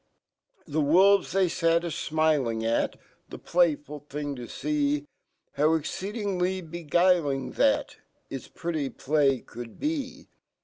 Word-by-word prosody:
The 155 -1 -1
wol 190 +7 +6
ves, - - -11
fhey 190 +1 +3
sat 165 0 +2
aflniling 155 -8 0
at 115 +1 0 0.3
The - - -8
playful 150 -4 0
fhrn$ 145 0 -4
,to 120 -1 -7
fee 145 0 -1 0.5
exceedingly 185 +5 0
beguiling 170 -3 +1
that - - +1 0.3
It 135 - -4
5 - - -18
pretty 155 -5 -2
play 140 -3 +1
could 120 -1 -10
be. 285 -4 -3
155 Hz, 120 wpm, -27 LUFS, 145-180 Hz, 0.5 s, wol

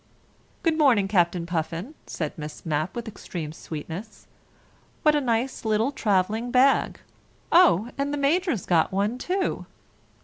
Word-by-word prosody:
"Good 325 -2 +1
morning, 240 -10 +4
Captain 175 -3 +1
Puffin," 170 - -3
said 155 -3 -4
Miss 150 -1 -8
Mapp 155 +2 -1
with 235 -1 -5
extreme 170 -7 -6
sweetness. 165 +7 -8 0.8
"What 305 -2 +5
a 295 - +2
nice 245 +1 -1
little 220 +4 +1
travelling 215 0 0
bag! 260 +2 +3 0.5
Oh, 250 - +5
and 280 +1 0
the 290 - -2
Major's 290 - +1
got 165 -3 +2
one 205 +6 -1
too! 370 +6 -2
220 Hz, 135 wpm, -25 LUFS, 175-275 Hz, 0.8 s, What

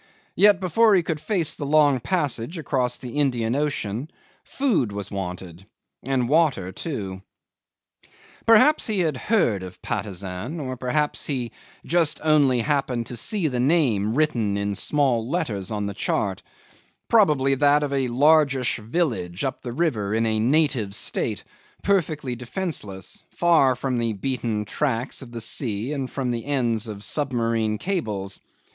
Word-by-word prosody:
Yet 205 -2 +5
before 210 +4 +4
he 180 - +3
could 160 -2 -3
face 165 -3 0
the 145 - -5
long 145 -3 +4
passage 145 -1 -1
across 130 -6 -1
the 125 +2 -7
Indian 120 -4 +1
Ocean 140 -3 -2 0.3
food 220 - 0
was 100 0 -6
wanted 90 -1 -6 0.4
water 130 - +1
too. 95 - -5 1.3
'Perhaps 230 +7 +5
he 210 -4 0
had 155 -4 0
heard 125 - +1
of 90 -1 -9
Patusan 95 - -4
or 130 -3 -4
perhaps 130 +4 -1
he 125 -5 -3 0.3
just 165 -3 +1
only 145 -6 +3
happened 130 -3 -1
to 125 - -6
see 185 - 0
the 125 -4 -2
name 120 - +2
written 120 -10 +1
in 100 0 -1
small 125 0 +1
letters 115 - -2
on 105 -1 -2
the 100 - -3
chart - - -1 0.7
probably 150 -12 +4
that 145 +2 +3
of 140 -1 -2
a 135 -2 +1
largish 135 -1 +3
village 110 - -2
up 135 -1 -3
a - - -3
river 120 -9 -1
in 115 +1 +1
a 110 -1 0
native 125 -5 +1
state, - - 0 0.4
perfectly 155 -9 0
defenceless, 120 - -4
far 160 -7 +3
from 125 -1 -2
the 115 -1 0
beaten 115 -1 -2
tracks 130 +2 -2
of 125 -3 -9
the 115 -1 -4
sea 115 +2 -1
and 135 -3 -3
from 130 -3 -2
the 120 +2 -4
ends 120 -5 +1
of 105 -2 -7
submarine 115 -4 0
cables. 105 - -3
130 Hz, 145 wpm, -24 LUFS, 110-150 Hz, 1.3 s, Yet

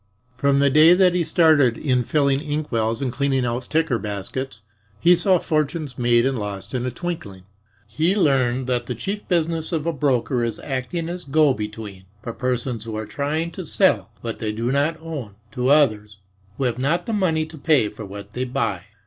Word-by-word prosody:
From 140 +2 +2
the 140 0 +3
day 155 +4 +7
that 180 -1 +4
he 180 -1 +1
started 155 -7 +4
in 130 -4 +1
filling 140 +1 +2
inkwells 140 -6 -1
and 125 -3 -2
cleaning 135 -1 0
out 120 +1 -3
ticker 155 -7 +1
baskets, 110 +4 -5 0.4
he 175 +10 +6
saw 185 +2 +3
fortunes 155 -3 -1
made 120 -1 +3
and 135 -3 0
lost 100 +1 -6
in 125 0 -1
a - - 0
twinkling. 125 - -6 0.4
He 155 - +1
learned 130 -8 +2
that 125 -1 -1
the 125 - -3
chief 200 - -5
business 165 -2 0
of 160 -3 -1
a 170 - 0
broker 130 -3 0
is 115 -2 -3
acting 140 +5 -3
as 175 +1 -5
go 145 0 +3
between 105 -3 -7 0.2
for 115 - -5
persons 125 -2 -2
who 110 -1 -5
are 110 - -4
trying 155 +7 -2
to - - -7
sell - - +2
what 115 -1 -5
they 110 -1 -2
do 115 +3 -2
not 145 +4 +1
own 145 -11 -7 0.2
to 125 +3 -1
others 110 -8 +3 0.4
who - - -2
have 125 -1 -1
not 145 +7 0
the 230 - -3
money 165 -6 +1
to 160 +1 -12
pay 145 -7 +3
for 105 +1 -9
what 100 +1 -9
they 125 - -2
buy. 115 -8 -2
135 Hz, 195 wpm, -22 LUFS, 115-155 Hz, 0.4 s, day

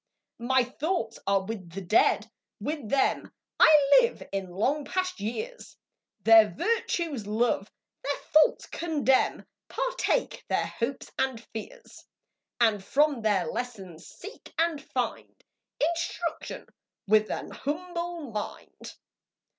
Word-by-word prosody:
My 255 +2 +3
thoughts 255 -2 -3
are 195 -1 +3
with 190 -6 -7
the 195 - -5
Dead, 195 +4 +3 0.3
with 295 -7 -4
them 275 +2 +1 0.3
I 295 - +7
live 475 0 -2
in 195 -2 -3
long 260 +12 0
past 370 +3 -2
years, 445 - -5 0.5
Their 225 -1 +8
virtues 325 - -1
love, 215 -1 0 0.3
their 285 +1 -2 0.2
faults 310 0 +5
condemn, 295 -6 +1 0.2
Partake - - -1
their - - +1
hopes 255 +3 -4
and 265 -3 0
fears, 485 - -9 0.6
And 220 -4 +3
from 290 +1 +2
their 205 -4 +2
lessons 195 -10 -6
seek 410 +4 -11
and 325 -2 +1
find 250 -3 -4 0.4
Instruction 335 +1 -2 0.4
with 215 +1 +4
^n - - -5
humble 340 -1 -4
mind. 210 -1 -7
265 Hz, 115 wpm, -28 LUFS, 215-335 Hz, 0.6 s, Their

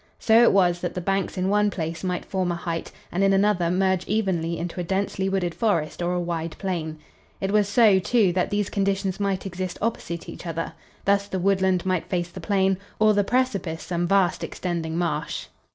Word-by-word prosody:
So 225 +1 +5
it 240 - +6
was 175 -3 +3
that 175 - -3
the - - -1
banks 195 +2 -1
in 185 0 0
one 210 +1 +3
place 165 -4 -4
might 180 -1 -2
form 185 -2 -1
a - - -1
height 170 -1 -4 0.2
and 185 +3 0
in 195 0 +4
another 195 -3 +2
merge 190 0 +1
evenly 180 -6 0
into 175 +1 -4
a - - -1
densely 190 +1 -1
wooded 185 -3 -1
forest 170 -9 0
or 175 +1 0
a 180 - 0
wide 170 -2 -3
plain. 165 -5 -3 0.4
It 195 0 -1
was 210 -1 +3
so, 210 -3 +5
too, 200 -1 +2
that 180 0 0
these 205 -1 0
conditions 195 -1 0
might 200 -2 -1
exist 185 -1 -4
opposite 200 -6 -3
each - - -8
other. 165 0 -3 0.3
Thus 200 0 +2
the 190 - -3
woodland 190 -1 +2
might 185 -3 -1
face 175 -2 -1
the - - -8
plain, 195 -2 +1 0.2
or 215 0 +5
the 205 0 +3
precipice 195 -9 -1
some 175 +1 -1
vast 185 -3 +2
extending 165 -1 -3
marsh. 170 -4 -2
185 Hz, 200 wpm, -24 LUFS, 175-200 Hz, 0.4 s, it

